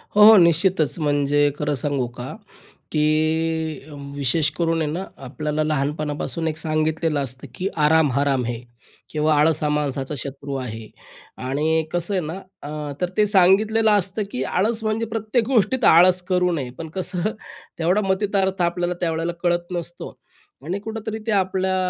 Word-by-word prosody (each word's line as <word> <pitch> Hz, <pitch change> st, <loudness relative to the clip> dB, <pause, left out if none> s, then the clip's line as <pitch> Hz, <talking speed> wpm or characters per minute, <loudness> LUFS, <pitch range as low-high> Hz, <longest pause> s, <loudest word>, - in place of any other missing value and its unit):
हो, 210 Hz, -, +7 dB
हो 220 Hz, +1 st, +10 dB
निश्चितच 170 Hz, -2 st, +3 dB
म्हणजे 145 Hz, -1 st, +2 dB
खरं 150 Hz, 0 st, -1 dB
सांगू 140 Hz, -1 st, -1 dB
का, 125 Hz, +2 st, -6 dB, 0.6 s
की 155 Hz, 0 st, 0 dB, 0.3 s
विशेष 145 Hz, +2 st, +1 dB
करून 165 Hz, -1 st, +1 dB
आहे 150 Hz, -, -1 dB
ना 175 Hz, +5 st, -3 dB, 0.2 s
आपल्याला 150 Hz, +3 st, -2 dB
लहानपणापासून 150 Hz, +2 st, -2 dB
एक 155 Hz, -, -2 dB
सांगितलेलं 155 Hz, 0 st, 0 dB
असतं 130 Hz, +2 st, -6 dB
की 185 Hz, -, -2 dB, 0.2 s
"आराम 160 Hz, 0 st, +4 dB
हराम 135 Hz, -1 st, +1 dB
है." 120 Hz, -1 st, -3 dB, 0.5 s
किंवा 155 Hz, 0 st, +1 dB
"आळसा 155 Hz, 0 st, +2 dB
हा -, -, +1 dB
माणसाचा 145 Hz, -1 st, -2 dB
शत्रू 140 Hz, +2 st, -5 dB
आहे." 115 Hz, -4 st, -6 dB, 0.6 s
आणि 155 Hz, +4 st, +1 dB
कसं 175 Hz, +3 st, 0 dB
आहे 185 Hz, -, +1 dB
ना 155 Hz, -, -4 dB, 0.3 s
अ, 150 Hz, 0 st, -5 dB
तर 180 Hz, -, 0 dB
ते 210 Hz, -, +5 dB
सांगितलेलं 210 Hz, +3 st, +4 dB
असतं 205 Hz, +1 st, +1 dB
की 130 Hz, -, -2 dB
आळस 220 Hz, -, 0 dB
म्हणजे 215 Hz, +1 st, 0 dB
प्रत्येक 225 Hz, +1 st, -1 dB
गोष्टीत 260 Hz, 0 st, +2 dB
आळस 180 Hz, +2 st, +6 dB
करू 180 Hz, -1 st, +2 dB
नये. 135 Hz, -6 st, -3 dB
पण 160 Hz, -1 st, -6 dB
कसं 185 Hz, +2 st, -1 dB, 0.5 s
तेवढा 180 Hz, +6 st, +2 dB
मतितार्थ 190 Hz, -1 st, 0 dB
आपल्याला 175 Hz, 0 st, 0 dB
त्यावेळेला 165 Hz, 0 st, -1 dB
कळत 175 Hz, 0 st, 0 dB
नसतो. 175 Hz, 0 st, -6 dB, 0.6 s
आणि 185 Hz, +5 st, -2 dB
कुठेतरी 220 Hz, +1 st, -5 dB
ते 220 Hz, -, +1 dB
आपल्या 190 Hz, -1 st, +1 dB
160 Hz, 155 wpm, -22 LUFS, 150-190 Hz, 0.6 s, हो